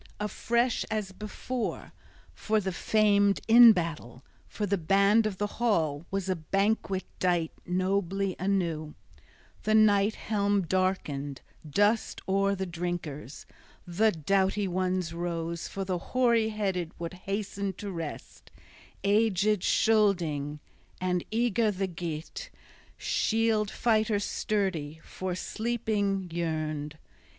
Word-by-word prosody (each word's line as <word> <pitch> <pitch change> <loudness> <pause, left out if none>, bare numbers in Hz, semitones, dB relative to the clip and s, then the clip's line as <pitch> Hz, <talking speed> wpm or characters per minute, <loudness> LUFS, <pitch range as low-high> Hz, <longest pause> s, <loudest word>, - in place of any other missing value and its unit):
Afresh, 235 +3 0
as 210 -3 -2
before, 215 +4 -5 0.4
for 215 -1 0
the 190 -2 -2
famed 205 +1 +3
in 235 +1 +10
battle, 165 - -3 0.2
for 210 - -3
the 200 0 +1
band 200 +5 +3
of 200 -3 -5
the 205 - 0 0.2
hall, 165 -9 +1
was 195 -1 -2
a 185 - +1
banquet 195 +3 0 0.2
dight 175 -3 +1 0.2
nobly 190 +1 0
anew. 170 -6 -1 0.7
The 215 - +2
Night 210 -1 +4
Helm 205 -2 0
darkened 160 -7 -1 0.3
dusk 205 +8 +1
o'er 195 +1 +2
the 190 0 -3
drinkers. 170 -5 -5 0.4
The 210 +6 +2
doughty 195 +4 +1
ones 185 -2 -1
rose: 170 -1 -3
for 195 -1 -4
the 185 -2 -1
hoary 235 +1 +2
headed 190 -6 -2
would 170 +1 -5 0.2
hasten 200 -1 -2
to 200 +2 -6
rest, 165 -4 -7 0.5
aged 210 -1 +2
Scylding; 170 -10 +2 0.4
and 180 -1 0
eager 230 0 +2
the 195 -1 -1
Geat, 170 - -6 0.5
shield 220 -2 +1
fighter 220 -2 +1
sturdy, 185 -8 -2
for 185 -1 -4
sleeping 210 -3 -1
yearned. 155 -3 -3
195 Hz, 115 wpm, -28 LUFS, 170-215 Hz, 0.7 s, in